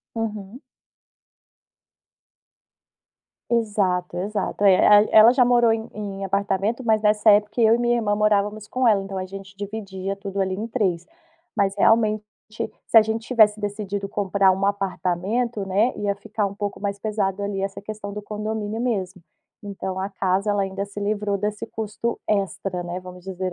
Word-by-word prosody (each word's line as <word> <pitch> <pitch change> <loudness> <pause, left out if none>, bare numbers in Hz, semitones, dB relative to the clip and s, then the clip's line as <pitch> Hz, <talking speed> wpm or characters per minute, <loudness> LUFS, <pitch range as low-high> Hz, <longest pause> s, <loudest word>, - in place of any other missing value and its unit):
Uhum. 215 0 -5 2.9
Exato, 205 -6 0
exato. 205 +2 -2
É, 205 +2 +7
e - - -12
ela 220 +2 +8
já 255 -1 +4
morou 240 -1 +4
em 225 0 -3
em 200 -2 -6
apartamento, 200 +5 -1
mas, 220 -1 +3
nessa 210 0 +4
época, 210 +3 +3
eu 225 0 +6
e - - +1
minha 240 0 +2
irmã 210 -3 +1
morávamos 210 0 +1
com 255 -1 0
ela, 205 -3 +4
então 195 0 -5
a 185 - -4
gente 195 +1 -10
dividia 195 -2 -5
tudo 200 0 -5
ali 190 -1 0
em 215 +4 -4
3, 190 -8 -1 0.5
mas 200 -1 +1
realmente 215 -2 +3 0.6
se - - 0
a 225 - +10
gente 220 +1 -3
tivesse 215 -4 +4
decidido 205 -1 -4
comprar 195 -1 +2
um 190 +1 -2
apartamento, 200 +3 -1
né, 205 +6 +2
ia 200 -1 -1
ficar 210 +1 -3
um 195 - -6
pouco 205 -1 -4
mais 200 -1 -3
pesado 205 -2 -2
ali 200 -1 -3
essa 195 0 -4
questão 205 -1 -7
do 210 - -6
condomínio 215 +1 -4
mesmo. 195 -6 -2 0.4
Então 190 -2 -5
a 190 +1 -2
casa 195 +1 0
ela 205 -1 +1
ainda 195 +1 -3
se 200 +1 -8
livrou 205 0 -1
desse 210 +1 -3
custo 220 +2 -4
extra, 195 -2 -1
né, 175 +1 -5
vamos 180 0 -12
dizer 185 -1 -4
205 Hz, 165 wpm, -23 LUFS, 195-215 Hz, 2.9 s, a